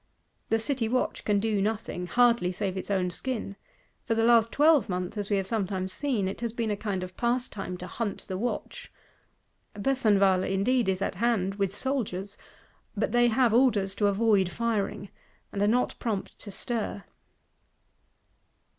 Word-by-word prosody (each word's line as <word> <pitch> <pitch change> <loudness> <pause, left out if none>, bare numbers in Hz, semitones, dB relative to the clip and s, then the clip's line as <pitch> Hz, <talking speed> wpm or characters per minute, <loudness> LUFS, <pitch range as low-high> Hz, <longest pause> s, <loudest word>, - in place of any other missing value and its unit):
The 225 - +2
City 230 -1 -1
watch 255 +2 -1
can 205 -1 +2
do 210 -1 0
nothing; 210 -4 -2
hardly 235 -3 +3
save 190 0 -3
its 190 - -5
own 185 -3 0
skin: 225 -2 -4 0.5
for 225 - 0
the 225 - +2
last 230 -1 +5
twelve 300 -4 +4
month, 180 +1 -3
as 205 -1 -3
we 205 - +2
have 195 - -1
sometimes 190 -3 -2
seen, 250 -10 -1
it 195 - -5
has 235 -2 -2
been 230 -2 -1
a - - 0
kind 200 -3 -3
of 185 0 -8
pastime 235 -6 -2
to 180 - -7
hunt 215 +1 -4
the 190 - -6
Watch. 240 +3 -4 0.8
Besenval 200 -5 +3
indeed 215 +4 +1
is 190 +1 0
at - - -1
hand 215 -5 +1
with 195 -2 +1
soldiers; 205 -4 -2 0.6
but - - 0
they 240 0 +4
have 235 0 +3
orders 220 -6 +3
to 205 +1 +1
avoid 200 -2 +3
firing, 210 -2 -2 0.4
and 200 - -3
are 205 - +3
not 245 +4 +2
prompt 215 -5 -3
to 205 - -7
stir. 210 0 -3
210 Hz, 165 wpm, -28 LUFS, 195-235 Hz, 0.8 s, last